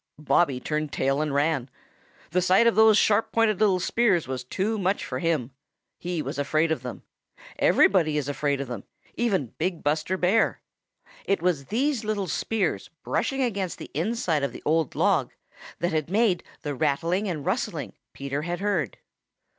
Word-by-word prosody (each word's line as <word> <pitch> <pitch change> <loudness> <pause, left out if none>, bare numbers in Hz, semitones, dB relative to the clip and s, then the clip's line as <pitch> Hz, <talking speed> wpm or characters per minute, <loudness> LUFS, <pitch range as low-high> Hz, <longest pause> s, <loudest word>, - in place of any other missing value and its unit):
Bobby 150 -2 +2
turned 150 +2 -2
tail 135 +2 0
and 155 -1 -1
ran. 140 -2 0 0.6
The 180 - +2
sight 185 +5 +4
of 235 - +5
those 220 -1 +6
sharp 215 +2 +3
pointed 225 -4 +2
little 200 -4 +3
spears 195 - +2
was 130 -1 -4
too 205 - -2
much 190 +1 0
for 130 -5 -4
him. 155 -6 0 0.5
He 175 -3 -3
was - - -5
afraid 155 +3 +1
of 160 - -1
them. 125 -1 -7 0.6
Everybody 160 -6 +4
is 145 -2 -2
afraid 145 -1 -1
of 140 - -5
them, 120 -5 -6 0.3
even 190 - -1
big 175 +1 -2
Buster 155 +5 0
Bear. 190 +5 +2 0.7
It 195 -4 0
was 165 -7 +1
these 250 - 0
little 210 -2 -1
spears 210 +5 -1
brushing 270 -1 0
against 200 -7 -2
the - - -10
inside 165 - 0
of 140 -3 -2
the - - -10
old 160 -1 +1
log - - +2 0.4
that 175 - -1
had 155 -1 -1
made 200 -2 +2 0.2
the 145 - -2
rattling 165 +8 0
and 155 -5 -4
rustling - - -2 0.2
Peter 140 +1 -4
had 175 +2 -3
heard. 185 - -1
170 Hz, 170 wpm, -26 LUFS, 145-200 Hz, 0.7 s, those